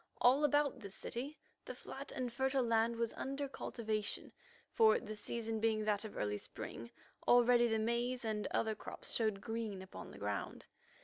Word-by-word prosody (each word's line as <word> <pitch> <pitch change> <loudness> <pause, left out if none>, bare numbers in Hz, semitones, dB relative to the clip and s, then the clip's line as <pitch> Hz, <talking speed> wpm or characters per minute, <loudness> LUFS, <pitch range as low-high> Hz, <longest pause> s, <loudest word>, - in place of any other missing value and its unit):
All 260 +4 +6
about 290 -2 +3
this 200 -4 -7
city 275 +6 -4 0.3
the - - -6
flat 275 +1 -7
and 250 -2 -3
fertile 265 +1 +2
land 230 0 +3
was 230 -1 -1
under 275 +1 -3
cultivation, 215 -5 -3 0.4
for 220 -1 +6
the 215 -2 -6
season 225 +1 -2
being 215 -1 +2
that 210 -1 +1
of 215 - -7
early 105 0 -1
spring, 115 +3 -7 0.4
already 240 0 +6
the 225 -1 +2
maize 235 +2 0
and 215 -1 -1
other 220 -1 +1
crops 215 - -4
showed 215 -4 +1
green 225 -3 -3
upon 190 - -9
the - - -11
ground. 100 -1 -3
230 Hz, 170 wpm, -37 LUFS, 215-245 Hz, 0.4 s, All